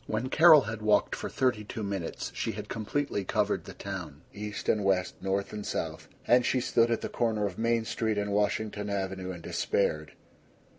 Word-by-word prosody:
II - - -5
When 120 +4 -1
Carol 155 0 +8
had 115 -3 -5
walked 105 -1 +3
for - - -5
thirty 125 -5 +1
two 105 +1 -6
minutes 100 -4 -4
she - - -2
had - - -7
completely 115 0 -2
covered - - 0
the - - -9
town, 85 -7 -6
east 105 +1 -6
and 105 - +2
west, 95 -2 +1
north 95 +2 -1
and 105 -1 -5
south; - - -4 0.2
and 125 +1 +5
she 130 - +2
stood 120 -1 +2
at 115 - 0
the - - -2
corner 110 -3 0
of 95 -1 -4
Main 115 0 +1
Street 110 -1 -1
and 105 0 -1
Washington 105 0 0
Avenue 95 -2 -3
and 85 -2 -9
despaired. 75 -6 -1
105 Hz, 195 wpm, -29 LUFS, 95-115 Hz, 0.2 s, Carol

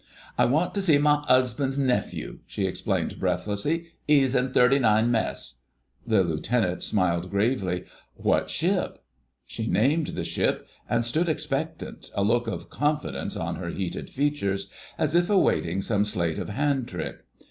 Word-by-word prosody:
"I - - +4
want 155 +8 +1
to 200 - 0
see 165 -7 +5
my 150 0 +3
'usband's 130 +1 +2
nephew," 130 -3 -1
she - - -2
explained - - -2
breathlessly; 150 +12 -1 0.2
"'e's 135 -3 +4
in 125 0 +1
39 120 -3 +4
Mess." 110 - -2 0.5
The 110 -4 +4
Lieutenant 90 +4 0
smiled 90 -3 0
gravely. 100 -3 0 0.3
"What - - +1
ship?" - - 0 0.5
She 110 - -5
named 145 +9 +2
the - - -4
ship, - - -1 0.2
and 115 -1 +1
stood 160 +9 0
expectant, 155 +1 -3
a 100 - +1
look 120 +3 +2
of 115 - -5
confidence 150 0 -1
on - - -3
her 85 -1 -5
heated 90 0 -4
features, 135 -9 -1 0.3
as 155 -1 0
if 175 +2 +3
awaiting 95 - +2
some 105 -2 +1
sleight 85 -6 -1
of - - -4
hand 135 +2 0
trick. 90 -8 -5
120 Hz, 145 wpm, -26 LUFS, 100-145 Hz, 0.5 s, see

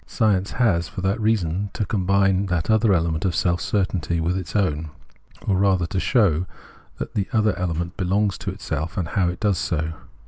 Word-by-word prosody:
Science 100 -4 +1
has 95 -9 +2
for 95 - -7
that 100 +4 0
reason 100 -3 0
to 105 - -2
combine 100 0 +2
that 90 +2 0
other 110 -1 +4
element 80 -3 +1
of 90 -4 0
self 85 -2 +1
certainty 85 0 0
with 85 +2 0
its 90 -4 -5
own, 80 -6 0 0.6
or 95 - +2
rather 95 -2 +3
to 95 +3 -2
show 95 - +2 0.5
that - - -5
the 100 -2 -1
other 110 -2 +2
element 85 0 -2
belongs 100 +2 +1
to - - -4
itself, 80 +7 -4
and 90 -4 -1
how 90 -3 +1
it 90 - -5
does 105 -4 +1
so. 80 0 -1
95 Hz, 185 wpm, -23 LUFS, 85-100 Hz, 0.6 s, other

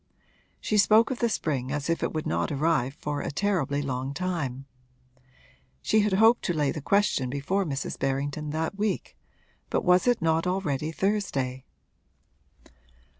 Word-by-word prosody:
She 215 - +1
spoke 215 +4 +5
of 255 - -3
the 235 - +2
spring 135 - -2
as 150 0 -2
if 165 0 0
it - - -1
would 155 -1 -3
not 85 +1 -1
arrive 145 -3 +1
for 145 -2 -3
a - - -3
terribly 145 -5 0
long 135 0 -3
time. 145 -8 -3 1.2
She 220 - +3
had 210 -1 +2
hoped 225 +5 +5
to 175 - +1
lay 145 -3 +1
the 155 - -5
question 200 -7 +1
before 145 +9 -1
Mrs. 140 -4 -4
Berrington 140 +3 -2
that 160 +6 -3
week 210 -2 -2 0.5
but - - -1
was 180 +4 +4
it 245 -1 +3
not 165 +1 +1
already 160 -5 -1
Thursday? 150 -10 -1
155 Hz, 155 wpm, -27 LUFS, 140-195 Hz, 1.2 s, spoke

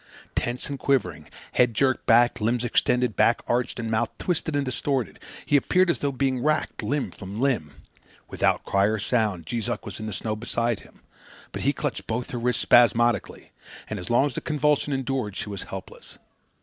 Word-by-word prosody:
Tense 120 +1 -2
and 140 -1 -5
quivering, 90 - 0 0.2
head 120 -2 +3
jerked 130 +1 +1
back, 120 +1 +4
limbs 115 +3 +1
extended, 125 -1 +1
back 115 - +3
arched 120 0 -1
and 115 -1 -3
mouth 110 +1 +1
twisted 160 -3 -1
and 145 -1 +1
distorted, 130 -1 -2 0.3
he - - +2
appeared 180 +5 +4
as - - -3
though 140 - 0
being 130 -1 0
racked 155 +1 0
limb 145 -1 -1
from 100 +2 -8
limb. 120 - 0 0.5
Without - - +1
cry 100 0 +2
or 110 +2 +1
sound, 105 -7 0
Jees 115 +1 -3
Uck - - -3
was - - -7
in 110 - -5
the 110 - -4
snow 110 +4 -3
beside 115 0 -1
him; - - -19 0.5
but - - -5
he 140 - +3
clutched 145 -4 -4
both 115 +2 -3
her 120 - -3
wrists 125 0 0
spasmodically, 120 0 +3 0.4
and 110 - -4
as 90 - -7
long 120 +4 +4
as 145 - -2
the - - -4
convulsion 150 -1 +1
endured 135 -6 -2
she 105 - -4
was 100 -2 -5
helpless. 95 -1 -9
120 Hz, 190 wpm, -25 LUFS, 110-135 Hz, 0.5 s, back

